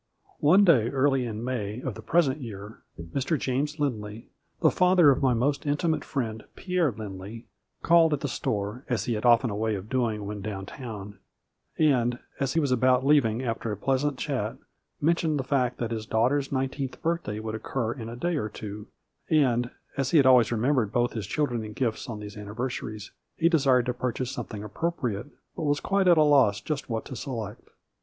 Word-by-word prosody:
One 180 Hz, +8 st, +6 dB
day 125 Hz, -, +5 dB
early 135 Hz, -1 st, +2 dB
in 110 Hz, 0 st, -5 dB
May 115 Hz, -3 st, -3 dB
of 130 Hz, -2 st, -4 dB
the 110 Hz, -, -9 dB
present 150 Hz, +1 st, +2 dB
year 105 Hz, -2 st, -8 dB, 0.2 s
Mr. 130 Hz, -, -2 dB
James 145 Hz, +4 st, -2 dB
Lindley, 110 Hz, -6 st, -3 dB, 0.3 s
the -, -, +5 dB
father 180 Hz, -4 st, +5 dB
of 130 Hz, -, 0 dB
my 130 Hz, -3 st, +3 dB
most 140 Hz, +5 st, 0 dB
in 145 Hz, -1 st, 0 dB
timate 160 Hz, -1 st, 0 dB
friend, 110 Hz, -6 st, -3 dB
Pierre 180 Hz, -4 st, 0 dB
Lindley, 105 Hz, +1 st, -8 dB, 0.4 s
called 165 Hz, -1 st, +5 dB
at 145 Hz, -, -1 dB
the 145 Hz, -, -1 dB
store, 105 Hz, 0 st, -3 dB
as 120 Hz, -3 st, 0 dB
he 120 Hz, -, 0 dB
had 110 Hz, +2 st, -3 dB
often 120 Hz, 0 st, +5 dB
a -, -, -3 dB
way 110 Hz, 0 st, 0 dB
of 100 Hz, +2 st, -7 dB
doing 115 Hz, -5 st, -1 dB
when 105 Hz, 0 st, -5 dB
down 95 Hz, -2 st, -5 dB
town, 105 Hz, -4 st, -8 dB, 0.6 s
and, 125 Hz, -6 st, +3 dB, 0.2 s
as 135 Hz, -1 st, 0 dB
he 165 Hz, -, +2 dB
was 145 Hz, -4 st, 0 dB
about 130 Hz, +1 st, +3 dB
leaving 130 Hz, -5 st, +3 dB
after 115 Hz, -2 st, -2 dB
a 105 Hz, -, -3 dB
pleasant 135 Hz, +4 st, 0 dB
chat, -, -, -2 dB, 0.4 s
mentioned 160 Hz, -1 st, +1 dB
the -, -, -1 dB
fact 130 Hz, -2 st, 0 dB
that 120 Hz, -1 st, -3 dB
his 110 Hz, -2 st, -4 dB
daughter's 135 Hz, +5 st, +1 dB
nineteenth 135 Hz, 0 st, -2 dB
birthday 165 Hz, -11 st, -1 dB
would 110 Hz, 0 st, -5 dB
occur 110 Hz, +1 st, -2 dB
in 115 Hz, -4 st, -7 dB
a 120 Hz, -, -7 dB
day 170 Hz, +6 st, -1 dB
or 110 Hz, -6 st, -2 dB
two, 105 Hz, 0 st, -8 dB, 0.4 s
and, 125 Hz, -6 st, +3 dB, 0.3 s
as 135 Hz, -2 st, 0 dB
he 150 Hz, -3 st, +5 dB
always 125 Hz, -4 st, +5 dB
remembered 120 Hz, -1 st, +1 dB
both 120 Hz, 0 st, +1 dB
his 110 Hz, -4 st, -4 dB
children 125 Hz, -4 st, -1 dB
in 105 Hz, 0 st, -7 dB
gifts 115 Hz, 0 st, -2 dB
on 110 Hz, -3 st, -5 dB
these 105 Hz, -1 st, -8 dB
anniversaries, 110 Hz, 0 st, -5 dB, 0.3 s
he 165 Hz, -, +3 dB
de 165 Hz, -2 st, +4 dB
sired 130 Hz, -3 st, +3 dB
to 125 Hz, -, -1 dB
purchase 125 Hz, 0 st, -3 dB
something 105 Hz, -2 st, -6 dB
appropriate, 125 Hz, -2 st, -3 dB, 0.3 s
but -, -, -5 dB
was 145 Hz, 0 st, +2 dB
quite 195 Hz, -1 st, +1 dB
at 175 Hz, -2 st, +6 dB
a 155 Hz, -, +6 dB
loss 135 Hz, -9 st, +4 dB
just 140 Hz, +1 st, -4 dB
what 110 Hz, -1 st, -2 dB
to 130 Hz, -, -7 dB
select. 115 Hz, -5 st, -6 dB
125 Hz, 195 wpm, -27 LUFS, 110-145 Hz, 0.6 s, One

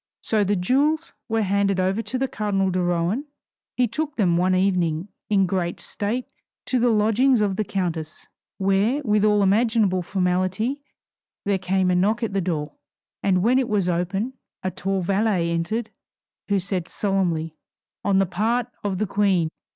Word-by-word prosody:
So 215 Hz, -2 st, +2 dB
the 205 Hz, +1 st, +1 dB
jewels 290 Hz, -, +1 dB, 0.2 s
were 225 Hz, -1 st, +1 dB
handed 200 Hz, -1 st, +1 dB
over 190 Hz, +4 st, +1 dB
to 255 Hz, -, -3 dB
the 265 Hz, +1 st, 0 dB
cardinal 195 Hz, -5 st, 0 dB
de 180 Hz, 0 st, 0 dB
Rohan; 175 Hz, -, 0 dB, 0.5 s
he 250 Hz, -1 st, +3 dB
took 300 Hz, +6 st, -3 dB
them 180 Hz, -6 st, +2 dB
one 185 Hz, +2 st, +2 dB
evening 180 Hz, -2 st, +1 dB, 0.2 s
in 195 Hz, -2 st, +3 dB
great 175 Hz, -2 st, -2 dB
state 225 Hz, +5 st, -3 dB, 0.4 s
to 255 Hz, -, +1 dB
the 240 Hz, +1 st, +3 dB
lodgings 225 Hz, +4 st, +3 dB
of 205 Hz, -2 st, +1 dB
the 215 Hz, -, 0 dB
countess, 170 Hz, -5 st, -4 dB, 0.3 s
where 200 Hz, +8 st, +1 dB
with 210 Hz, -4 st, +2 dB
all 210 Hz, -1 st, +4 dB
imaginable 210 Hz, -2 st, +2 dB
formality 185 Hz, +8 st, -1 dB, 0.6 s
there 200 Hz, -1 st, +1 dB
came 185 Hz, 0 st, +1 dB
a -, -, +2 dB
knock 215 Hz, +6 st, +1 dB
at 220 Hz, -, -2 dB
the 195 Hz, -, +1 dB
door, 155 Hz, -5 st, -2 dB, 0.5 s
and 185 Hz, -2 st, +2 dB
when 250 Hz, +4 st, +4 dB
it 260 Hz, -, -1 dB
was 200 Hz, -4 st, +1 dB
open 180 Hz, +8 st, -1 dB, 0.3 s
a 185 Hz, -, -1 dB
tall 195 Hz, +1 st, -2 dB
valet 190 Hz, -2 st, +1 dB
entered 215 Hz, +7 st, -2 dB, 0.6 s
who 200 Hz, -, +2 dB
said 185 Hz, -2 st, -2 dB
solemnly 175 Hz, -6 st, -1 dB, 0.5 s
"On 200 Hz, -1 st, +2 dB
the 195 Hz, -, +4 dB
part 220 Hz, +7 st, 0 dB, 0.2 s
of 200 Hz, -2 st, -1 dB
the 215 Hz, -, 0 dB
Queen!" 195 Hz, -5 st, +1 dB
195 Hz, 165 wpm, -23 LUFS, 180-220 Hz, 0.6 s, all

